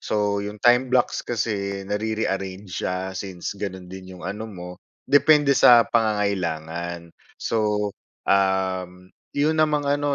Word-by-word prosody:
so 105 Hz, -1 st, 0 dB
'yong 105 Hz, +1 st, -6 dB
time 125 Hz, +2 st, +4 dB
blocks 125 Hz, -1 st, +1 dB
kasi 100 Hz, -4 st, -3 dB
nare-rearrange 100 Hz, -2 st, -3 dB
siya 95 Hz, +1 st, -3 dB
since 95 Hz, -2 st, -5 dB
gano'n 95 Hz, -3 st, -5 dB
din 95 Hz, -1 st, -9 dB
'yong 90 Hz, -, -11 dB
ano 100 Hz, +4 st, -4 dB
mo 90 Hz, -3 st, -8 dB, 0.4 s
depende 145 Hz, 0 st, +5 dB
sa 120 Hz, -1 st, +8 dB
pangangailangan. 85 Hz, -6 st, -1 dB, 0.3 s
So, 105 Hz, -2 st, 0 dB, 0.4 s
um, 95 Hz, -1 st, 0 dB, 0.2 s
'yon 155 Hz, +2 st, +1 dB
namang 150 Hz, -1 st, +2 dB
ano, 145 Hz, 0 st, +1 dB
100 Hz, 125 wpm, -23 LUFS, 95-115 Hz, 0.4 s, sa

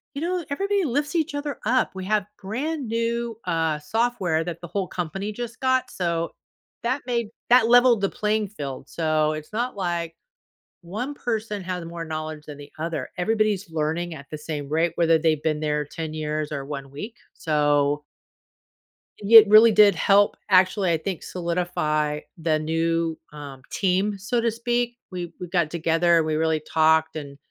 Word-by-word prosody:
you 285 Hz, -, -4 dB
know, 355 Hz, 0 st, -1 dB
everybody 395 Hz, +5 st, 0 dB
lifts 290 Hz, +4 st, -1 dB
each 315 Hz, -2 st, 0 dB
other 290 Hz, -1 st, -4 dB
up, 255 Hz, +3 st, +2 dB
we 190 Hz, -, -5 dB
have 210 Hz, 0 st, +1 dB
grand 265 Hz, +7 st, -3 dB
new, 230 Hz, 0 st, -1 dB
uh, 160 Hz, -3 st, 0 dB
software 190 Hz, -5 st, 0 dB
that 175 Hz, -1 st, -5 dB
the 175 Hz, -, -7 dB
whole 190 Hz, +1 st, -2 dB
company 195 Hz, +4 st, -4 dB
just 235 Hz, +1 st, -6 dB
got, 260 Hz, -1 st, +1 dB
so 170 Hz, -2 st, -1 dB, 0.5 s
that 255 Hz, +4 st, 0 dB
made 235 Hz, -3 st, -1 dB, 0.2 s
that 240 Hz, -2 st, +6 dB
leveled 245 Hz, -3 st, +6 dB
the 195 Hz, -, +1 dB
playing 215 Hz, 0 st, 0 dB
field, 140 Hz, -9 st, -7 dB
so, 155 Hz, -2 st, +1 dB
it's 155 Hz, +5 st, -8 dB
not 240 Hz, +3 st, -2 dB
like 170 Hz, -3 st, -2 dB, 0.7 s
one 215 Hz, +11 st, -5 dB
person 220 Hz, -6 st, -3 dB
has 180 Hz, -1 st, -4 dB
more 170 Hz, 0 st, -6 dB
knowledge 155 Hz, -1 st, -5 dB
than 145 Hz, -1 st, -8 dB
the 145 Hz, 0 st, -12 dB
other, 165 Hz, 0 st, -3 dB
everybody's 210 Hz, 0 st, 0 dB
learning 160 Hz, +2 st, -2 dB
at 140 Hz, -1 st, -11 dB
the 155 Hz, -, -4 dB
same 150 Hz, -2 st, -5 dB
rate, 165 Hz, +2 st, +1 dB
whether 165 Hz, -1 st, +4 dB
they've 155 Hz, -2 st, +1 dB
been 155 Hz, -1 st, 0 dB
there 150 Hz, -1 st, 0 dB
10 160 Hz, +1 st, -6 dB
years, 155 Hz, 0 st, -3 dB
or 140 Hz, -2 st, -4 dB
1 140 Hz, -1 st, -6 dB
week, 210 Hz, -, -7 dB, 0.2 s
so 145 Hz, -1 st, +1 dB, 1.1 s
i 205 Hz, -, -10 dB
it 225 Hz, -1 st, +10 dB
really 220 Hz, +2 st, +8 dB
did 210 Hz, -1 st, +6 dB
help, 200 Hz, +1 st, +4 dB
actually, 185 Hz, 0 st, +4 dB
I 165 Hz, -, +2 dB
think, 180 Hz, +2 st, -5 dB
solidify 170 Hz, -4 st, -1 dB, 0.2 s
the 160 Hz, -1 st, +1 dB
new, 165 Hz, +1 st, 0 dB, 0.2 s
um, 140 Hz, -3 st, -9 dB
team, 195 Hz, +2 st, +1 dB
so 215 Hz, +5 st, -1 dB
to 230 Hz, -1 st, +1 dB
speak. 240 Hz, +1 st, -1 dB
We 175 Hz, -2 st, -5 dB
we 180 Hz, -, -5 dB
got 170 Hz, -3 st, +1 dB
together, 165 Hz, 0 st, +3 dB
we 155 Hz, 0 st, -1 dB
really 160 Hz, 0 st, +1 dB
talked, 160 Hz, 0 st, +3 dB
and, 140 Hz, -2 st, -7 dB
175 Hz, 170 wpm, -24 LUFS, 155-220 Hz, 1.1 s, it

